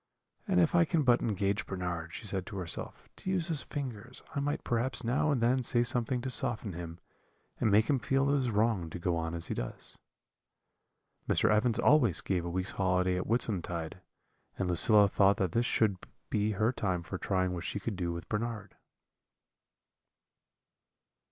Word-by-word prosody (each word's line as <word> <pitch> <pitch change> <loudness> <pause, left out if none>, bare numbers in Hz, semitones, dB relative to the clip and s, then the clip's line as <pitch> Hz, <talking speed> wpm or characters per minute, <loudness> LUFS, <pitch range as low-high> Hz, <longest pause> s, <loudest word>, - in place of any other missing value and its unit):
'And 185 -2 +3
if 165 -3 +3
I 170 -1 +6
can 165 -1 +1
but 125 -2 +4
engage 100 -4 -1
Bernard,' 90 -3 -4
she - - -7
said 95 -3 -2
to 100 - -6
herself, 90 -3 -5
'to - - -6
use 180 -2 0
his 155 -4 0
fingers, 125 -4 -6
I - - -1
might 145 +1 -2
perhaps 120 +1 0
now 125 +6 +1
and 140 -4 +2
then 125 +3 +3
say 120 -1 +2
something 120 +1 -1
to 130 - -3
soften 115 -6 -1
him, 85 0 -7 0.6
and 115 - +2
make 105 +2 +4
him 140 -3 +2
feel 135 +2 +1
it 145 - +3
is 125 -2 0
wrong 105 -5 +1
to 85 - -6
go 85 0 0
on 80 0 -2
as 85 - -4
he - - -3
does.' - - -5 1.3
"Mr. - - +3
Evans 110 +2 +2
always 125 - +4
gave 90 -3 -1
a - - -3
week's 95 +2 -2
holiday 90 -1 +1
at 90 - -3
Whitsuntide, 90 -8 -2 0.6
and 95 - -1
Lucilla 100 +4 +5
thought 100 0 +3
that 95 -3 0
this 120 +5 +1
should 105 -4 +2 0.3
be 105 +1 +1
her 110 +4 +2
time 95 -8 -2
for 95 +1 -6
trying 95 -2 0
what 85 -1 -4
she 100 - -3
could 105 +1 -4
do 90 -2 -2
with 85 +1 -6
Bernard." 105 -2 -4
105 Hz, 185 wpm, -31 LUFS, 90-120 Hz, 1.3 s, I